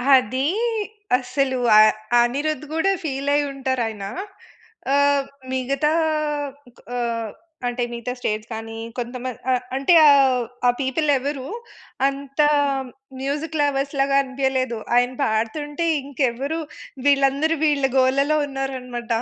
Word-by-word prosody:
అది 260 Hz, +2 st, +1 dB, 0.7 s
అసలు 260 Hz, +1 st, -1 dB, 0.2 s
అ -, -, +10 dB, 0.4 s
అనిరుద్ 290 Hz, +4 st, -1 dB
గూడా 350 Hz, +5 st, +2 dB
ఫీల్ 280 Hz, -2 st, -2 dB
అయి 290 Hz, -, +3 dB
ఉంటారు 260 Hz, -2 st, -1 dB
ఆయన. 210 Hz, -3 st, -6 dB, 0.9 s
ఆహ్, 285 Hz, -1 st, +3 dB, 0.3 s
మిగతా 270 Hz, +3 st, 0 dB, 1.0 s
ఆహ్, 230 Hz, -3 st, -2 dB, 0.4 s
అంటే 245 Hz, 0 st, -1 dB
మిగతా 235 Hz, +1 st, -4 dB
స్టేట్స్ 215 Hz, -1 st, -3 dB
కానీ, 225 Hz, 0 st, -6 dB, 0.2 s
కొంతమంది 250 Hz, 0 st, -5 dB
అ -, -, +4 dB, 0.2 s
అంటే 275 Hz, +6 st, +3 dB
ఆహ్, 265 Hz, -4 st, +5 dB, 0.2 s
ఆ -, -, +7 dB
పీపుల్ 270 Hz, +4 st, 0 dB
ఎవరు 270 Hz, 0 st, -4 dB, 0.6 s
అంత 275 Hz, +1 st, -6 dB, 0.8 s
మ్యూజిక్ 295 Hz, +3 st, -3 dB
లవర్స్‌లాగా 275 Hz, -1 st, +1 dB
అనిపియలేదు. 260 Hz, -3 st, -1 dB, 0.2 s
ఆయన 245 Hz, +1 st, +2 dB
పాడుతుంటే 290 Hz, +9 st, -1 dB, 0.2 s
ఇంకెవరు 275 Hz, +2 st, -2 dB, 0.5 s
వీళ్ళందరూ 280 Hz, +3 st, +3 dB
వీళ్ళ 290 Hz, -3 st, +2 dB
గోలలో 275 Hz, +4 st, +3 dB
ఉన్నారన్నమాట. 255 Hz, -3 st, -5 dB
270 Hz, 105 wpm, -22 LUFS, 245-285 Hz, 1.0 s, అ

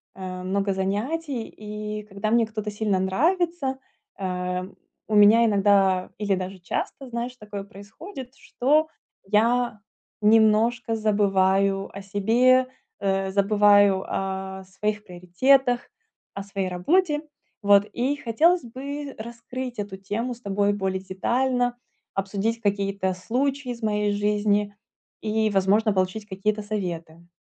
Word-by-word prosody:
э, 185 Hz, -1 st, -6 dB
много 195 Hz, +1 st, 0 dB
занятий. 230 Hz, +8 st, -2 dB
И 210 Hz, 0 st, -6 dB
когда 210 Hz, +1 st, -4 dB
мне 230 Hz, -1 st, +3 dB
кто-то 215 Hz, -1 st, -4 dB
сильно 205 Hz, -2 st, 0 dB
нравится, 290 Hz, -, 0 dB, 0.4 s
э, 180 Hz, -1 st, -2 dB, 0.5 s
у 215 Hz, -, +1 dB
меня 210 Hz, +3 st, +7 dB
иногда, 195 Hz, -3 st, +3 dB
или 200 Hz, -2 st, 0 dB
даже 185 Hz, +1 st, -5 dB
часто, 255 Hz, +8 st, -4 dB
знаешь, 240 Hz, +1 st, -4 dB
такое 210 Hz, -4 st, -7 dB
происходит, 245 Hz, -, -10 dB
что 300 Hz, +5 st, +1 dB, 0.4 s
я 235 Hz, +2 st, +2 dB, 0.4 s
немножко 225 Hz, +2 st, +3 dB
забываю 195 Hz, -2 st, +2 dB
о 200 Hz, -, -7 dB
себе, 235 Hz, +7 st, +3 dB, 0.3 s
э, 195 Hz, -1 st, 0 dB
забываю 205 Hz, -1 st, +4 dB
о 190 Hz, 0 st, -4 dB
своих 210 Hz, +2 st, -3 dB
приоритетах, 240 Hz, +8 st, +2 dB, 0.5 s
о 200 Hz, -, -5 dB
своей 195 Hz, -1 st, -3 dB
работе. 295 Hz, -, +1 dB, 0.4 s
Вот 200 Hz, -1 st, +5 dB
и 255 Hz, +6 st, 0 dB
хотелось 310 Hz, +8 st, +2 dB
бы 275 Hz, +4 st, -6 dB
раскрыть 235 Hz, +2 st, -7 dB
эту 200 Hz, -2 st, -5 dB
тему 215 Hz, +6 st, -3 dB
с 235 Hz, -, -14 dB
тобой 200 Hz, -1 st, +1 dB
более 190 Hz, -2 st, -2 dB
детально, 245 Hz, +6 st, 0 dB, 0.4 s
обсудить 200 Hz, +4 st, -2 dB
какие-то 200 Hz, -2 st, 0 dB
случаи 255 Hz, +7 st, -2 dB
из 235 Hz, -1 st, -7 dB
моей 210 Hz, -1 st, +1 dB
жизни 205 Hz, 0 st, +1 dB, 0.5 s
и, 220 Hz, 0 st, +1 dB
возможно, 200 Hz, +3 st, +3 dB
получить 190 Hz, +3 st, -1 dB
какие-то 210 Hz, +2 st, -2 dB
советы. 170 Hz, -5 st, -5 dB
210 Hz, 120 wpm, -24 LUFS, 195-240 Hz, 0.5 s, меня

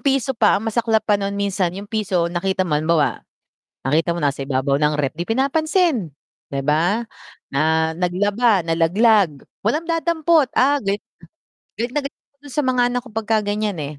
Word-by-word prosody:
piso 270 Hz, -2 st, +1 dB
pa 220 Hz, -4 st, +3 dB
ang 210 Hz, -, -4 dB
masaklap 225 Hz, -1 st, +1 dB
pa 205 Hz, -2 st, +2 dB
non 200 Hz, 0 st, -3 dB
minsan 200 Hz, -2 st, 0 dB
yung 200 Hz, -, -6 dB
piso 200 Hz, -5 st, -1 dB
nakita 190 Hz, +1 st, 0 dB
mo 170 Hz, -, -4 dB
halimbawa, 155 Hz, 0 st, +1 dB, 0.6 s
nakita 160 Hz, +5 st, +1 dB
mo 170 Hz, -, -2 dB
nasa 140 Hz, 0 st, 0 dB
ibabaw 135 Hz, +1 st, 0 dB
ng 150 Hz, 0 st, +2 dB
ref 140 Hz, -2 st, -1 dB
'di 170 Hz, +5 st, -6 dB
pinapansin, 280 Hz, -, +1 dB, 0.4 s
di 140 Hz, 0 st, -3 dB
ba? 170 Hz, +10 st, +1 dB, 0.5 s
Na 160 Hz, +3 st, +1 dB
naglaba, 195 Hz, +4 st, +1 dB
nalaglag, 170 Hz, -, +2 dB, 0.2 s
walang 270 Hz, +11 st, 0 dB
dadampot 330 Hz, -3 st, +2 dB
ah, 285 Hz, +3 st, +3 dB
galit 200 Hz, -1 st, -2 dB, 0.7 s
galit 235 Hz, +2 st, -3 dB
na 295 Hz, -, -1 dB
galit -, -, -11 dB, 0.2 s
dun 285 Hz, -1 st, -13 dB
sa 295 Hz, -, +1 dB
mga 255 Hz, -1 st, +1 dB
anak 245 Hz, 0 st, -1 dB
ko 245 Hz, -, -14 dB
pagka 220 Hz, 0 st, 0 dB
ganyan 205 Hz, 0 st, -1 dB
eh. 145 Hz, 0 st, -7 dB
205 Hz, 170 wpm, -20 LUFS, 165-245 Hz, 0.7 s, pa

